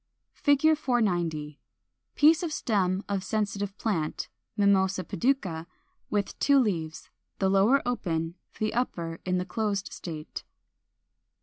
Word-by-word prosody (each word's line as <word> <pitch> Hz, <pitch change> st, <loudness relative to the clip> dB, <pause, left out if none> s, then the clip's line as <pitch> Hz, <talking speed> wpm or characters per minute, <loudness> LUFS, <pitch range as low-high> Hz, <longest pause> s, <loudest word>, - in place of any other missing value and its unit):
[Illustration: 290 Hz, +2 st, +5 dB
Fig. -, -, -18 dB
490. 175 Hz, -, 0 dB, 0.6 s
Piece 310 Hz, +3 st, +6 dB
of 340 Hz, -3 st, -2 dB
stem 195 Hz, -8 st, 0 dB
of 200 Hz, -2 st, -1 dB
Sensitive 205 Hz, -2 st, -2 dB
Plant 165 Hz, -9 st, -2 dB, 0.3 s
(Mimosa 195 Hz, -2 st, +3 dB
pudica), 185 Hz, -9 st, -1 dB, 0.4 s
with 205 Hz, -2 st, -2 dB
two 280 Hz, -1 st, +5 dB
leaves, 170 Hz, -11 st, -1 dB, 0.3 s
the 190 Hz, -, +2 dB
lower 210 Hz, +8 st, +4 dB
open, 165 Hz, -9 st, -1 dB, 0.2 s
the 215 Hz, 0 st, -1 dB
upper 170 Hz, -9 st, -2 dB
in 180 Hz, 0 st, +1 dB
the 180 Hz, -, -1 dB
closed 200 Hz, 0 st, -2 dB
state. 155 Hz, -3 st, -7 dB
200 Hz, 120 wpm, -28 LUFS, 175-230 Hz, 0.6 s, Piece